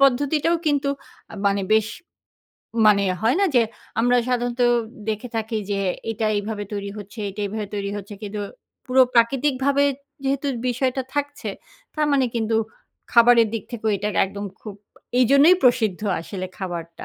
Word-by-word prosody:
পদ্ধতিটাও 285 +5 +3
কিন্তু 285 -2 +2 0.4
আ - - -8
মানে 200 0 +2
বেশ 220 -1 +4 1.0
মানে 205 -1 +5 0.2
হয় 235 +6 +3
না? - - +4
যে, 240 - +6 0.4
আমরা 245 +1 +3
সাধারণত 245 0 -1 0.5
দেখে 220 +3 -2
থাকি 220 0 -2
যে 200 - 0 0.3
এটা 220 0 -1
এইভাবে 205 0 -3
তৈরি 200 -1 -4
হচ্ছে, 205 +3 -11
এটা 195 +2 -8
এভাবে 210 +1 -4
তৈরি 200 -1 -2
হচ্ছে। 205 +1 -7
কিন্তু 210 0 -5 0.5
পুরো 260 +1 +5
প্রাকৃতিকভাবে 270 +3 +3 0.4
যেহেতু 275 +1 0 0.2
বিষয়টা 255 +2 0
থাকছে, 290 0 -3 0.5
তার 305 -1 +1
মানে 270 -2 +3
কিন্তু 225 -1 0 0.6
খাবারের 235 -1 +6
দিক 225 - -2
থেকেও 220 -2 -1
এটাকে 205 +1 -2
একদম 200 +1 -7 0.2
খুব 210 -2 -8 0.4
এইজন্যই 280 +8 +6
প্রসিদ্ধ 220 -6 +3 0.2
আসলে 185 +2 -5
খাবারটা। 170 -3 -6
230 Hz, 145 wpm, -23 LUFS, 205-265 Hz, 1.0 s, যে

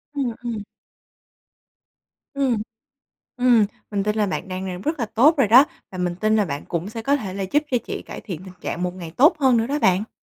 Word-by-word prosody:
Ừm, 255 -5 -1
ừm. 230 -4 -4 1.7
Ừm, 260 -6 +1 0.8
ừm, 245 -4 +4 0.2
mình 200 -2 0
tin 210 +1 0
là 210 -1 +2
bạn 190 - -4
đang 185 +1 -4
làm 180 -1 -5
rất 310 +6 -1
là 230 - 0
tốt 270 +10 +4
rồi 270 -6 +3
đó 250 +6 +8 0.3
và 185 - -8
mình 180 -1 -1
tin 215 +3 +2
là 210 - +3
bạn 145 -5 -5
cũng 170 +2 -2
sẽ 225 0 -6
có 280 +5 +2
thể 195 -9 -6
là 195 - -3
giúp 285 +11 +1
cho 255 - +2
chị - - -5
cải - - -7
thiện 180 -7 -7
tình 185 -1 -11
trạng 175 - -4
một 180 0 -2
ngày 175 -3 -8
tốt 300 +6 +6
hơn 260 -4 +4
nữa 225 0 +1
đó 285 +4 -1
bạn. 195 -3 +2
215 Hz, 230 wpm, -22 LUFS, 185-255 Hz, 1.7 s, đó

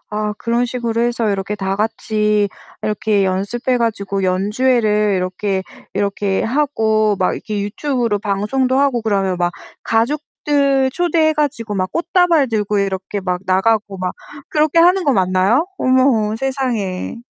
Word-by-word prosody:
아 210 0 -2
그런 235 +1 0
식으로 235 -2 -2
해서 235 -2 0
이렇게 195 +1 -3
다같이 210 +1 0 0.3
이렇게 210 -1 +1
연습해 200 +7 -1
가지고 200 -4 -1
연주회를 210 +2 +1
이렇게 190 +1 -2 0.3
이렇게 200 0 0
하고 220 -5 +1
막 185 - +1
이렇게 210 -2 -4
유튜브로 235 0 -1
방송도 215 +6 0
하고 275 -4 +2
그러면 195 -4 0
막 175 0 0 0.3
가족들 275 +2 +1
초대해 330 -1 +2
가지고 280 -8 -2
막 185 -1 -1
꽃다발 340 - +2
들고 210 -2 0
이렇게 195 0 -2
막 180 -1 -2
나가고 200 +1 +1
막 185 0 -3 0.3
그렇게 310 +1 +2
하는 360 +3 +5
거 285 - +3
맞나요? 190 - +2
어머, 255 -5 +2
세상에. 240 -9 -2
215 Hz, 310 characters per minute, -18 LUFS, 200-260 Hz, 0.3 s, 하는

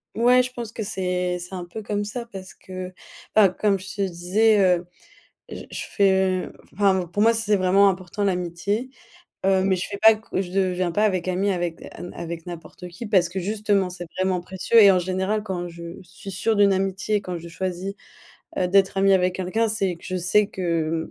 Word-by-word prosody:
Ouais, 245 +2 +5
je 250 0 -5
pense 235 -3 -6
que 230 - -6
c'est, 180 -3 -2
c'est 180 +2 -8
un 180 -1 -5
peu 175 +6 -8
comme 205 0 -2
ça 235 +3 -5
parce 190 -1 -9
que 185 0 -8 0.4
enfin, 205 -3 +7
comme 200 +2 +1
je 190 +2 -9
te 200 - -3
disais, 195 +4 +2 0.2
heu, 175 - -13 0.6
j - - -8
je - - -5
fais 190 -2 +2 0.3
enfin 190 -3 +2
pour 195 +5 -1
moi 230 +1 +6
c'est 225 -2 +1
vraiment 195 +1 +4
important 185 +2 -3
l'amitié, 195 +5 -1 0.5
heu, 190 -1 +3
mais 190 -1 +2
je 180 - -3
fais 200 - -6
pas 220 0 +8
que 215 -3 -4
je 185 -2 -4
deviens 185 -1 0
pas 210 +5 +1
avec 185 -4 0
ami 190 +2 +1
avec 175 -2 -4 0.3
avec 170 0 -6
n'importe 175 +1 -9
qui, 175 +7 -9
parce 190 -5 +3
que 185 +3 -4
justement 205 -1 0
c'est 180 -1 -7
vraiment 185 -1 +1
précieux 190 +6 +2
et 200 - +9
en 185 - +4
général 190 +4 -1
quand 180 -4 -4
je 170 0 -11 0.2
suis 185 +3 -11
sûre 210 +4 0
d'une 200 -1 +5
amitié, 195 +2 0
quand 180 -3 -5
je 170 0 -8
choisis, 185 +3 -4 0.7
heu, 180 - +1
d'être 195 +1 +3
amie 195 0 +5
avec 180 -1 +1
quelqu'un 205 +5 0
c'est 195 -5 -1
que 170 - -18
je 185 -1 -3
sais 190 +4 +2
que, 165 -3 -2
190 Hz, 200 wpm, -23 LUFS, 180-205 Hz, 0.7 s, et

